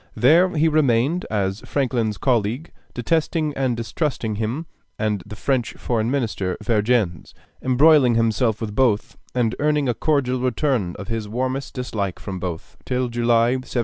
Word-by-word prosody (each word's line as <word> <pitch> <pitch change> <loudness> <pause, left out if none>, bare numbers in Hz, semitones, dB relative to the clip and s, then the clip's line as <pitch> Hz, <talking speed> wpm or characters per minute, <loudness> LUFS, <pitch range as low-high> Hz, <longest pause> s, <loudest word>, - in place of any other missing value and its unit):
There 165 +9 +5
he 155 +2 +4
remained 150 +2 +2
as 100 -2 -1
Franklin's 120 -6 -1
colleague, 120 - 0 0.2
detesting 155 +3 0
and 130 -3 0
distrusting 115 -3 -2
him 115 +9 -2 0.3
and 105 -3 -1
the 105 - -8
French 120 0 -1
foreign 115 -2 -1
minister, 110 -9 -1
Vergennes, 105 - 0 0.3
embroiling 130 -1 +5
himself 115 0 +1
with 105 -2 -4
both 110 -3 +1 0.2
and 120 -2 +1
earning 150 -1 +1
a 120 - +2
cordial 130 -3 0
return 125 - 0
of 100 - -8
his 110 -2 -3
warmest 130 +4 -3
dislike 105 -7 -3
from 95 -2 -6
both, 85 -3 -6
till 125 -1 -1
July, 120 0 +2
1780. 130 -1 -4
120 Hz, 145 wpm, -22 LUFS, 110-135 Hz, 0.3 s, There